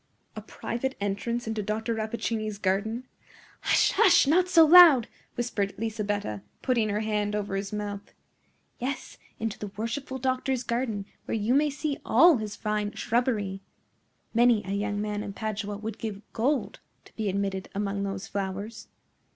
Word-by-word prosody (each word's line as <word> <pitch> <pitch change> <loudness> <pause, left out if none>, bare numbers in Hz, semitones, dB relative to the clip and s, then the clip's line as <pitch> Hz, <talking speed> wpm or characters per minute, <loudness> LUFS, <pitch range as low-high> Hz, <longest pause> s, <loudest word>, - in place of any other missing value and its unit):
"A 215 - -5
private 240 +4 -4
entrance 205 +4 -2
into 220 -1 -2
Dr. 220 +3 -2
Rappaccini's 220 -1 -2
garden?" 210 +5 -1 0.6
"Hush! - - +3
hush! 350 -5 +5
not 355 +6 +3
so 330 -3 +7
loud!" 320 -7 +9 0.3
whispered 205 -5 -2
Lisabetta, 205 - -2 0.2
putting 235 -5 +2
her 205 +1 0
hand 210 -1 -1
over 205 -1 -2
his 195 0 -3
mouth. 205 -1 -5 0.7
"Yes; 265 +3 -4 0.2
into 225 -2 -3
the 210 - -5
worshipful 265 +5 -3
doctor's 260 0 -1
garden, 235 -4 -2 0.2
where - - -1
you 220 +3 +1
may 295 +2 +4
see 285 0 -3
all 340 -4 +6
his 215 -2 -5
fine 210 -1 -2
shrubbery. 220 -5 -1 0.7
Many 235 -2 +4
a 195 - -4
young 205 +1 -1
man 210 0 -2
in 200 - -6
Padua 210 -1 -4
would 215 0 -6
give 215 -2 -5
gold 265 +5 0 0.3
to - - -19
be 215 -2 -1
admitted 195 0 -2
among 200 0 -1
those 195 -1 -3
flowers." 200 +3 -5
215 Hz, 150 wpm, -27 LUFS, 205-240 Hz, 0.7 s, loud